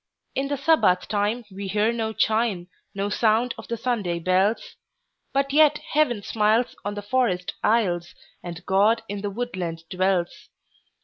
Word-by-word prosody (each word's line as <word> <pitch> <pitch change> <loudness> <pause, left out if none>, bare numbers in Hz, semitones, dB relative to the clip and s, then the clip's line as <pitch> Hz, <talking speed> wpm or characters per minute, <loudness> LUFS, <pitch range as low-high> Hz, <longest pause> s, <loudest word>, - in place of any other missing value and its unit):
In 275 +1 -1
the 285 0 -2
Sabbath 270 - +3
time 210 +3 -1
we 195 +1 -6
hear 210 +4 +1
no 225 -1 -2
chime, 215 -5 0 0.3
No 200 0 -1
sound 225 +3 +2
of - - -11
the 235 - -3
Sunday 210 -8 -1
bells; 185 +5 +1 0.6
But 275 0 0
yet 300 0 +5
Heaven 300 -8 0
smiles 220 +3 +1
on 205 +1 -3
the 205 - -5
forest 205 -6 0
aisles, 180 -6 +1 0.3
And 175 0 -8
God 210 +4 +3
in 200 0 -5
the 205 - -2
woodland 185 -7 -4
dwells. 185 -1 -1
210 Hz, 150 wpm, -24 LUFS, 190-240 Hz, 0.6 s, yet